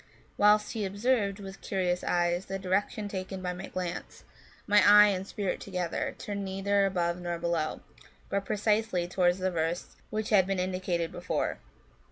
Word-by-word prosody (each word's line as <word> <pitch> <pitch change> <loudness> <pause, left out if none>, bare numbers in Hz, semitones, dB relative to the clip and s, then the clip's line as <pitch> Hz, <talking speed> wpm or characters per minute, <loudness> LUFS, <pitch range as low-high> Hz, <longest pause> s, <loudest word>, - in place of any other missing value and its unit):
Whilst 210 +1 +4
he 220 -3 -2
observed, 200 0 0
with 195 -1 -9
curious 180 -2 -1
eyes, 175 +1 +1
the 195 - -3
direction 195 +2 -1
taken 190 -1 -5
by 180 0 -1
my 180 +2 -7
glance, 180 -1 -5 0.4
my 205 0 +5
eye 210 0 +8
and 190 -1 -2
spirit 200 -3 -2
together 180 -3 -3
turned 200 -1 -4
neither 195 +1 +1
above 175 -2 -1
nor 175 -1 -2
below, 170 -2 -1 0.5
but 200 0 -1
precisely 210 -3 0
towards 180 0 +2
the 185 0 -1
verse 165 +1 -2
which 215 0 -3
had 190 -3 +5
been 195 -1 0
indicated 180 -2 -1
before. - - -2
190 Hz, 160 wpm, -29 LUFS, 180-205 Hz, 0.5 s, eye